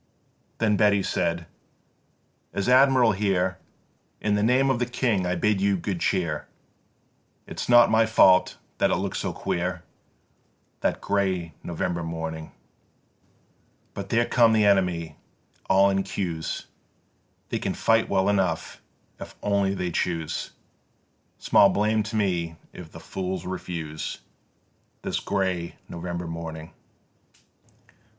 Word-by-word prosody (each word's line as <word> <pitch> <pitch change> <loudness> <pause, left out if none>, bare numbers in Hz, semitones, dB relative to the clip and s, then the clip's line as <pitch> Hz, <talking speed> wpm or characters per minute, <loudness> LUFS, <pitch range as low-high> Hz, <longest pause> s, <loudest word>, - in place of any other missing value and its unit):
4. 115 - 0
Then 105 -1 +3
Beatty 100 -1 +3
said: 85 -2 -1 1.1
"As 100 - -1
Admiral 130 -2 +5
here 95 -2 0 0.6
In 105 - 0
the 105 - +1
name 130 +5 +3
of 125 - -1
the 125 - 0
King 115 -7 0
I 90 - 0
bid 100 +2 +1
you 100 -1 +2
good 90 0 -3
cheer: 85 -7 -1 1.0
It's - - -6
not 120 -1 +7
my 110 0 +4
fault 95 -4 +5 0.2
that - - +3
it - - +2
looks - - -3
so - - -2
queer 90 0 -3 1.0
This - - +1
grey 95 -5 -1
November 85 0 -3
morning; 80 -1 -5 1.4
But - - -6
there 120 +1 +2
come 115 -2 +4
the 110 -1 +3
enemy 90 -5 +1 0.5
all 95 +1 +5
in 95 0 +1
queues; 85 -5 -4 0.8
They - - -2
can - - -2
fight 115 0 +2
well 95 0 +2
enough 95 -2 0 0.4
if - - -9
only 100 -1 +1
they 90 -2 -2
choose; 80 -2 -2 0.9
Small 100 - +5
blame 110 +1 +1
to 110 +1 -5
me 90 -6 0 0.2
if - - -10
the - - -10
fools 95 -1 -4
refuse, 85 -4 -5 0.9
This - - -1
grey 95 -4 -2
November 85 0 -5
morning. 80 0 -7
95 Hz, 130 wpm, -25 LUFS, 85-105 Hz, 1.4 s, not